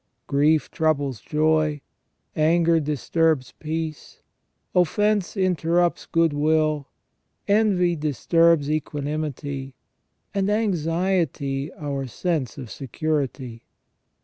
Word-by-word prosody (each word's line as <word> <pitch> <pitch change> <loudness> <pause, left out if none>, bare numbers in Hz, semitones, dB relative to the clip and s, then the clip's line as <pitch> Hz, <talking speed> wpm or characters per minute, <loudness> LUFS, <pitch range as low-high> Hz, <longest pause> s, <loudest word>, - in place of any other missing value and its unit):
Grief 150 +2 +2
troubles 145 -6 0
joy, 155 -1 +1 0.6
anger 165 +1 +3
disturbs 150 -1 0
peace, 160 -1 -5 0.5
offence 205 +3 +1
interrupts 175 -2 +1
good 165 -2 +2
will, 155 -1 +1 0.6
envy 200 -4 +3
disturbs 155 +1 +2
equanimity, 145 -2 -3 0.6
and 200 0 0
anxiety 170 -7 0
our 140 -3 -4
sense 150 - -2
of 125 -5 -8
security. 135 -3 -3
155 Hz, 80 wpm, -24 LUFS, 145-170 Hz, 0.6 s, anger